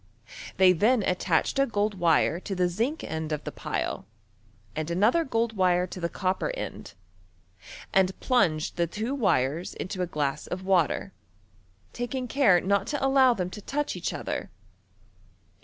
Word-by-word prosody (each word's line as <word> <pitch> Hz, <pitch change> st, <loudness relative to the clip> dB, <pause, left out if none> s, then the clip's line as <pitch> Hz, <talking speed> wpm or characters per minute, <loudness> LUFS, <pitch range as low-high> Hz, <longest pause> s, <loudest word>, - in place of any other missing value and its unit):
They 185 Hz, -1 st, +6 dB
thea 215 Hz, +6 st, +3 dB
attached 180 Hz, -, +1 dB
a 275 Hz, -, +3 dB
gold 210 Hz, -1 st, 0 dB
wire 170 Hz, -1 st, +3 dB
to 195 Hz, +1 st, -5 dB
the 180 Hz, -1 st, 0 dB
unc 295 Hz, +6 st, -3 dB
end 160 Hz, 0 st, -4 dB
of 150 Hz, -, -2 dB
the -, -, -5 dB
pile, -, -, -4 dB, 0.7 s
ajui 155 Hz, +1 st, -3 dB
another 215 Hz, -, +3 dB
gold 230 Hz, -4 st, -1 dB
wire 180 Hz, -2 st, +3 dB
to 185 Hz, -, -8 dB
the 170 Hz, -1 st, -2 dB
copper 185 Hz, +1 st, -1 dB
end, -, -, -7 dB, 1.0 s
and 190 Hz, -1 st, +2 dB
plunged 165 Hz, -, +1 dB
the 170 Hz, 0 st, +1 dB
two 220 Hz, -, -3 dB
wires 170 Hz, -, 0 dB
into 185 Hz, 0 st, -4 dB
a 180 Hz, -, 0 dB
glass 145 Hz, -4 st, -2 dB
of 185 Hz, +1 st, -5 dB
water, 165 Hz, -, +1 dB, 0.8 s
taking 250 Hz, +1 st, -3 dB
care 235 Hz, -9 st, +4 dB
not 200 Hz, +2 st, 0 dB
to 290 Hz, -2 st, -1 dB
allow 265 Hz, -2 st, +5 dB
them 180 Hz, -3 st, -3 dB
to 210 Hz, -, -8 dB
touch 295 Hz, +7 st, -2 dB
each -, -, -3 dB
other. -, -, -4 dB
190 Hz, 155 wpm, -27 LUFS, 170-235 Hz, 1.0 s, They